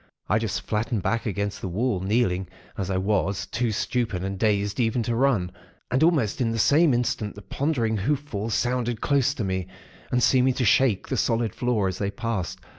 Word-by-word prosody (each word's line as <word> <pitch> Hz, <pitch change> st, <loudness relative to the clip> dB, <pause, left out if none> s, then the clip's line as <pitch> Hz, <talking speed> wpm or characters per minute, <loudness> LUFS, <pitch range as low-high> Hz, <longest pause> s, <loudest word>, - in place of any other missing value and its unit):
I 105 Hz, +3 st, +2 dB
just 95 Hz, -5 st, -2 dB
flattened 110 Hz, 0 st, -2 dB
back 115 Hz, +4 st, 0 dB
against 100 Hz, 0 st, -3 dB
the -, -, -3 dB
wall, 105 Hz, +3 st, 0 dB
kneeling, 95 Hz, -2 st, 0 dB, 0.3 s
as 95 Hz, -1 st, -3 dB
I 95 Hz, -, 0 dB
was, 95 Hz, 0 st, 0 dB
too 120 Hz, -2 st, -1 dB
stupid 110 Hz, -3 st, -1 dB
and 95 Hz, 0 st, -4 dB
dazed 105 Hz, 0 st, +1 dB
even 115 Hz, 0 st, +1 dB
to 115 Hz, +1 st, -1 dB
run. 115 Hz, -8 st, +2 dB, 0.4 s
And 130 Hz, -, +2 dB
almost 150 Hz, -, +2 dB
in 115 Hz, -2 st, +1 dB
the 115 Hz, -, -2 dB
same 150 Hz, +7 st, +4 dB
instant 120 Hz, -4 st, -1 dB
the 100 Hz, -, -11 dB
ponderous 120 Hz, -7 st, -1 dB
hoof 140 Hz, +8 st, 0 dB
falls 110 Hz, -6 st, -3 dB
sounded 120 Hz, -2 st, 0 dB
close 140 Hz, +1 st, +2 dB
to 115 Hz, -, -3 dB
me, 95 Hz, -2 st, -2 dB, 0.4 s
and 125 Hz, -1 st, +2 dB
seeming 130 Hz, 0 st, +4 dB
to 125 Hz, -, 0 dB
shake 110 Hz, -2 st, +3 dB
the -, -, -1 dB
solid 115 Hz, -3 st, +1 dB
floor, 120 Hz, -5 st, 0 dB
as 95 Hz, -, -4 dB
they 100 Hz, -, 0 dB
passed. 105 Hz, -4 st, -3 dB
110 Hz, 195 wpm, -25 LUFS, 100-125 Hz, 0.4 s, same